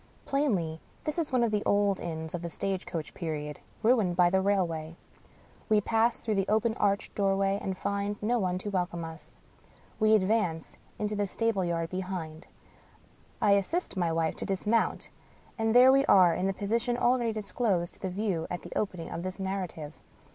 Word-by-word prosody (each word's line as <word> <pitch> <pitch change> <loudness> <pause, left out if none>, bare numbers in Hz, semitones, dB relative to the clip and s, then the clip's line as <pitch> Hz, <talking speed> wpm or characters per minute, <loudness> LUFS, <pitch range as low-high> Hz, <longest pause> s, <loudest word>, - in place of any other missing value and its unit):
Plainly, 195 - 0 0.2
this 305 +2 -2
is 315 -4 -2
one 250 -2 +3
of 230 - +1
the 210 -1 +1
old 200 -1 +2
inns 160 -1 -5
of 175 - -3
the 170 - -4
stage 190 +2 -3
coach 160 -3 -5
period, 150 -4 -4 0.2
ruined 220 -6 +3
by 175 -1 +4
the 190 0 +3
rail 195 -1 +2
way. 160 -1 -6 0.7
We 215 -1 +5
pass 225 +3 +1
through 220 - -2
the 195 -1 0
open 220 +2 +2
arched 200 0 0
doorway, 195 0 +1
and 190 -1 -3
find 200 +1 -2
no 235 +3 +1
one 180 -3 0
to 205 +3 -4
welcome 175 -3 -2
us. 160 0 -10 0.6
We 215 0 +5
advance 185 -5 0 0.2
into 210 0 -2
the 205 -1 0
stable 225 -1 0
yard 165 -1 -2
behind; 180 -3 -5 0.9
I 205 - +3
assist 200 - +1
my 175 -3 0
wife 165 -1 0
to - - -3
dismount 210 +4 0 0.2
— - - -29
and 225 +1 +1
there 255 +1 +9
we 275 +1 +5
are 180 -3 +6
in 185 +3 0
the 195 - 0
position 230 +5 -1
already 245 -1 +2
disclosed 200 -4 -1
to 190 - -2
view 185 -3 -2
at 175 - -5
the - - -8
opening 180 -5 -3
of 165 - -4
this 185 +2 -5
narrative. 185 -6 -4
195 Hz, 185 wpm, -29 LUFS, 175-215 Hz, 0.9 s, there